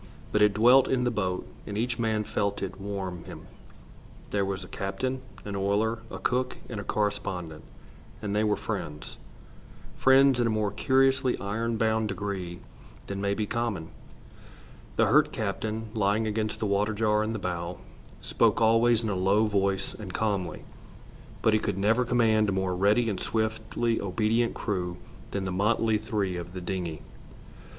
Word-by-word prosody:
But 105 - +2
it 105 -1 +5
dwelt 125 +5 +6
in 130 -2 +1
the 125 - +1
boat, 95 -4 -2 0.2
and 100 - -4
each 120 +1 -1
man 110 -2 +1
felt 100 -1 -1
it 95 0 -5
warm 95 -3 -4
him. - - -10 0.9
They 100 - +1
were 95 0 0
a 95 -1 -8
captain, 130 +9 -3 0.2
an 100 -1 -4
oiler, 105 +4 +1
a - - -6
cook, 125 0 -1
and 110 - -5
a - - -4
correspondent, 95 -7 -2 0.6
and 105 -1 -3
they 105 - +2
were 105 -1 +2
friends, 75 0 -5 0.8
friends 135 -1 +5
in 120 - +3
a - - +1
more 110 -2 0
curiously 130 +3 +3
iron 115 +3 -2
bound 110 0 +1
degree 95 -4 -4 0.4
than 100 0 -4
may 100 0 +1
be 110 - -1
common. 105 -7 -2 1.1
The - - +4
hurt - - +4
captain, 110 +1 -3
lying 105 +1 +1
against 110 0 -1
the - - -1
water 105 +2 +1
jar 105 0 +2
in 110 +1 -1
the 110 - -2
bow, 90 -2 -3 0.4
spoke - - +2
always 115 +1 +4
in 110 - -1
a - - -1
low 100 +4 +3
voice 100 -2 0
and 105 -4 -8
calmly, 100 -3 -2 0.8
but 110 - +4
he 110 - +4
could 100 -2 -2
never 115 +5 +2
command 110 -3 +3
a - - 0
more 95 -1 0
ready 105 +6 +3
and 105 -4 -1
swiftly 110 +1 -1
obedient 110 +4 +1
crew 90 -5 -2 0.3
than 100 -1 -3
the 95 - -2
motley 110 +3 +2
three 105 -4 -2
of 90 +1 -7
the 90 - -5
dingey. 90 -4 -4
105 Hz, 170 wpm, -28 LUFS, 95-110 Hz, 1.1 s, dwelt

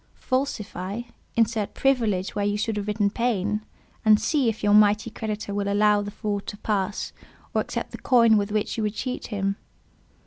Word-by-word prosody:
Falsify: 220 -6 -2 0.3
insert 225 -2 +1
"privilege" 225 -9 +1
where 205 - -1
you 205 0 +1
should 220 +1 -1
have 205 0 -3
written 205 -1 +1
"pain;" 210 -3 0 0.4
and 215 -2 +6
see 280 -7 +2
if 220 -1 -5
your 205 0 +4
mighty 210 +1 +5
creditor 215 -2 -4
will 200 0 -1
allow 210 0 +4
the 205 - -4
fraud 205 -1 -3
to 205 - -5
pass, 205 -2 -2 0.4
or - - +2
accept - - -4
the - - -8
coin 230 -3 +5
with 205 0 +1
which 215 +1 -1
you - - 0
would 210 0 -1
cheat 255 +2 -4
him. 200 -2 -1
210 Hz, 180 wpm, -25 LUFS, 205-225 Hz, 0.4 s, and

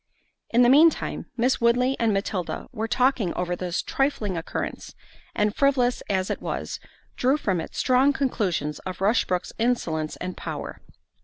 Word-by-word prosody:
In 240 +1 +4
the 240 - +5
mean 300 +5 +8
time, - - -5
Miss 250 +2 +1
Woodley 250 +3 +3
and 230 -2 +2
Matilda 195 -3 -2
were 220 +1 -3
talking 250 -6 +1
over 180 0 -1
this 180 0 -2
trifling 250 -9 -1
occurrence; 165 0 -5 0.4
and 210 0 +1
frivolous 260 -3 +2
as 190 -2 0
it - - -3
was, - - -4 0.4
drew 265 +4 +3
from 190 - -1
it - - -9
strong 260 +2 +3
conclusions 195 - -1
of 185 -1 -7
Rushbrook's 195 -3 +1
insolence 165 -11 0
and 180 0 -5
power. - - -6
225 Hz, 155 wpm, -25 LUFS, 185-255 Hz, 0.4 s, mean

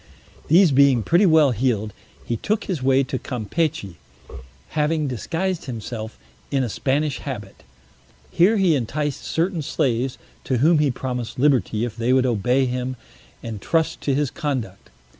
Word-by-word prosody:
These 175 +1 +5
being 135 -3 +4
pretty 175 - +4
well 155 -4 +5
healed, 110 -3 -1 0.3
he 120 - -1
took 215 - -1
his 175 -8 -3
way 135 +1 +3
to 130 -1 -4
Campechy, 125 - -3 0.7
having 155 0 0
disguised 170 - -3
himself 115 -3 -6 0.3
in 135 -2 +1
a 120 - -2
Spanish 140 +5 -1
habit; 105 -8 -7 0.7
here 200 +6 +4
he 190 -4 +3
enticed 145 +3 -2
certain 170 0 -1
slaves, 130 -2 -1 0.3
to 130 - 0
whom 155 +6 +4
he 150 -1 +3
promised 125 -2 -4
liberty 125 -5 +2
if 115 -3 -6
they 120 +2 +1
would 130 0 +3
obey 125 +3 +2
him 125 +1 -3 0.5
and 110 -3 -6
trust 160 +6 0
to 140 - 0
his 145 -2 0
conduct. 130 - -4
135 Hz, 150 wpm, -22 LUFS, 120-155 Hz, 0.7 s, These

